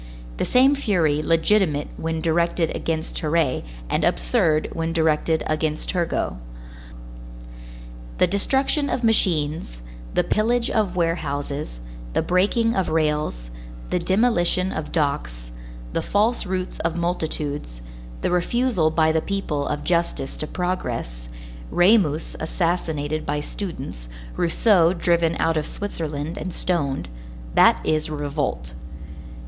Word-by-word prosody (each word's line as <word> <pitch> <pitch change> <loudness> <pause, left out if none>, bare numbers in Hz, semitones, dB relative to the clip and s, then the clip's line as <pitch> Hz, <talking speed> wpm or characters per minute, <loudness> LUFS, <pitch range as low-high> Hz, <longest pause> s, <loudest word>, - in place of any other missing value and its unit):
The - - 0
same 265 +3 +5
fury 175 - +1
legitimate 165 -1 +2
when 160 0 -3
directed 170 0 +1
against 160 -1 -3
Terray 155 -4 +1 0.2
and - - 0
absurd 155 - +2
when 165 0 -2
directed 160 0 +1
against 155 0 -1
Turgot. 170 - -1 1.8
The - - +5
destruction 270 - +1
of 245 - -1
machines, 160 - +1 0.4
the - - +3
pillage 235 +2 +1
of 205 -5 0
warehouses, 145 - -2 0.3
the - - +1
breaking 210 +6 +2
of 190 - 0
rails, 150 - -1 0.4
the - - +2
demolition 185 -1 +2
of 155 - -4
docks, - - -2 0.4
the - - 0
false 215 +1 +1
routes 185 0 -3
of 165 0 -1
multitudes, 150 - -2 0.4
the - - 0
refusal 180 -1 +2
by 160 0 +3
the 160 0 +1
people 155 -8 -2
of 150 0 -2
justice 170 -6 0
to 155 - -4
progress, 120 - -3 0.4
Ramus 175 -5 +3
assassinated 160 -3 -1
by 145 0 -1
students, 140 - -6 0.3
Rousseau 175 0 +3
driven 170 -2 +2
out 165 0 +1
of 155 - -1
Switzerland 160 -4 -4
and 185 - -5
stoned,—that - - +1
is 155 0 +1
revolt. 145 - -3
165 Hz, 115 wpm, -23 LUFS, 145-185 Hz, 1.8 s, same